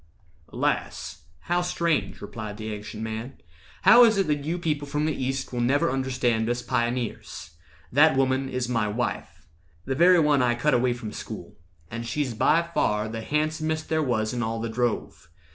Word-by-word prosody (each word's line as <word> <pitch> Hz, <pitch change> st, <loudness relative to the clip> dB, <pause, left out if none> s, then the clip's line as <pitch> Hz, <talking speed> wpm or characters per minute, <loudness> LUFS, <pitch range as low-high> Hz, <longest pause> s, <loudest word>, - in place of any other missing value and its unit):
"Alas! 75 Hz, -, -2 dB, 0.2 s
how 175 Hz, +1 st, 0 dB
strange," 170 Hz, -3 st, -1 dB
replied 105 Hz, -3 st, -7 dB
the 110 Hz, 0 st, -5 dB
Ancient 105 Hz, +1 st, -7 dB
Man; 110 Hz, +4 st, -5 dB, 0.5 s
"How 240 Hz, +1 st, +9 dB
is 225 Hz, -3 st, +5 dB
it 195 Hz, -, +2 dB
that 150 Hz, -2 st, -1 dB
you 165 Hz, +3 st, -1 dB
people 150 Hz, -4 st, -2 dB
from 150 Hz, +1 st, -1 dB
the 155 Hz, -, 0 dB
East 135 Hz, 0 st, -3 dB
Will 120 Hz, -, -1 dB
never 130 Hz, +3 st, +2 dB
understand 125 Hz, -4 st, 0 dB
us 120 Hz, 0 st, -1 dB
pioneers? 120 Hz, -1 st, -3 dB, 0.4 s
That 145 Hz, +1 st, +5 dB
woman 135 Hz, 0 st, +1 dB
is 125 Hz, -1 st, -2 dB
my 115 Hz, -3 st, 0 dB
wife—the 85 Hz, -, -5 dB
very 175 Hz, +5 st, +6 dB
one 150 Hz, -3 st, +3 dB
I 120 Hz, -1 st, +2 dB
cut 150 Hz, +5 st, +1 dB
away 125 Hz, 0 st, +2 dB
from 115 Hz, -3 st, -7 dB
school; -, -, -8 dB, 0.4 s
and 115 Hz, +1 st, -4 dB
she's 130 Hz, +1 st, -2 dB
by 155 Hz, +9 st, +3 dB
far 105 Hz, -5 st, +1 dB
The 110 Hz, 0 st, -5 dB
handsomest 155 Hz, +3 st, -1 dB
there 160 Hz, 0 st, +1 dB
was 115 Hz, -6 st, 0 dB
in 120 Hz, -, -2 dB
all 115 Hz, 0 st, -2 dB
the 115 Hz, 0 st, -3 dB
drove. 120 Hz, -5 st, -2 dB
125 Hz, 175 wpm, -25 LUFS, 115-150 Hz, 0.5 s, How